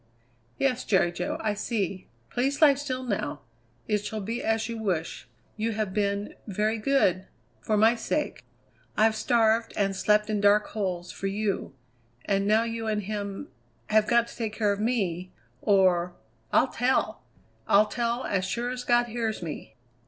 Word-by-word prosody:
"Yes, 255 -2 +1
Jerry 185 -4 +2
Jo, 175 +1 -3
I 215 -1 0
see. 200 -3 -3 0.2
Please 275 +4 0
lie 300 -3 +7
still 260 -2 -4
now. 195 - -3 0.5
It 210 -1 0
shall 215 +1 -4
be 225 +4 -4
as 225 0 0
you 230 -1 -5
wish. 180 -7 -2 0.3
You 220 +1 -1
have 210 -3 -2
been 200 0 -1
very 215 +2 0
good 205 -7 +2 0.3
for 215 - 0
my 220 +2 +6
sake!" 270 +6 -2 0.5
"I've 220 +1 +4
starved 225 0 +2
and 195 -1 +1
slept 210 +2 +2
in 210 -2 -1
dark 205 +1 +5
holes 185 -4 -3
for 195 - -4
you, 200 -7 -2 0.5
and 195 0 +1
now 215 +2 +4
you 230 -1 -4
and 210 -1 0
him 205 - -5 0.4
have 215 0 +4
got 235 0 +3
to - - -11
take 220 -3 -3
care 210 -2 +1
of 200 - -6
me 190 -6 -1 0.3
or 180 -3 +3 0.4
I'll - - +4
tell! 250 +2 0 0.5
I'll 205 +2 +6
tell, 235 +3 -2
as 195 -2 0
sure 240 +6 -2
as 250 0 -5
God 240 0 +3
hears 225 -4 -3
me!" 160 -3 -7
215 Hz, 165 wpm, -27 LUFS, 195-230 Hz, 0.5 s, lie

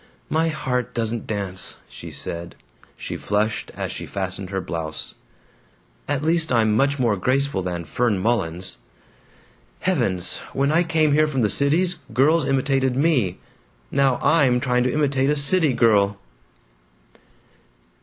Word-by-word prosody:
"My 160 +1 +2
heart 125 -5 -2
doesn't 115 0 -2
dance," 100 -3 -4
she - - -10
said. 85 0 -6 0.4
She - - -6
flushed 105 +1 -1
as - - -4
she - - -6
fastened 95 -1 -3
her 95 -1 -2
blouse. 80 -3 -4 0.9
"At 145 0 -1
least 160 -1 +1
I'm 110 -3 +3
much 140 +4 +2
more 120 -5 +2
graceful 130 +2 0
than 90 -2 -4
Fern 110 +5 0
Mullins. 95 -4 -1 1.0
Heavens! 115 - +1 0.2
When 140 +2 +1
I 165 +2 +4
came 160 -3 +2
here 155 +1 +4
from 135 -4 -1
the 105 - +2
Cities, 160 +5 +2 0.2
girls 150 +3 +3
imitated 135 -1 +1
me. 130 - +1 0.5
Now 135 -2 +2
I'm 135 -6 +4
trying 125 -1 +1
to 125 - +1
imitate 140 -2 +1
a 150 - +2
city 150 +2 +4
girl." 100 -4 +3
125 Hz, 135 wpm, -22 LUFS, 100-145 Hz, 1.0 s, I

